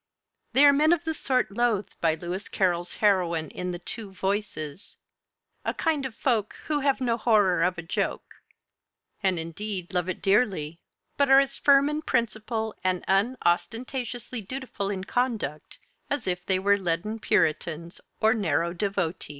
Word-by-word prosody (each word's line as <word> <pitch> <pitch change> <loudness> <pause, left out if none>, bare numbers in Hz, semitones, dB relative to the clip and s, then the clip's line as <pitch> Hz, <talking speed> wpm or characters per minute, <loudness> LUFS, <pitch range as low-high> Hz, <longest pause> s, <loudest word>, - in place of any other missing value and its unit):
They 280 +2 +7
are 285 - +8
men 305 +4 +4
of 345 - -1
the 320 -1 -1
sort 255 -8 0
loathed 220 -2 0
by 160 -2 +3
Lewis 175 +4 -5
Carroll's 175 -2 0
heroine 170 -6 +2
in 180 - -4
the 175 - -3
'Two 205 +4 -7
Voices,' 190 -4 -4 0.7
"a - - -2
kind 305 -5 0
of 235 - -13
folk 230 -5 0
Who 300 -1 0
have 275 -1 +1
no 235 -2 +1
horror 210 -6 +3
of 180 0 +1
a 175 - -5
joke," 165 - -3 0.8
and 190 -3 +1
indeed 180 +3 -5
love 180 0 0
it 185 - -3
dearly, 195 -7 +1 0.4
but 280 -1 +3
are 270 0 +8
as 275 0 0
firm 280 0 +5
in 300 +1 -1
principle 220 -4 -1
and 185 -1 0
unostentatiously 235 +4 -1
dutiful 220 -2 -4
in 190 -2 -3
conduct 220 - -2 0.3
as 285 -4 -2
if 180 -1 -3
they 190 - +3
were 200 +2 +3
leaden 185 +5 -2
Puritans 165 -2 0 0.2
or 220 0 +4
narrow 170 -6 0
devotees. 180 -3 -2
200 Hz, 160 wpm, -26 LUFS, 180-245 Hz, 0.8 s, are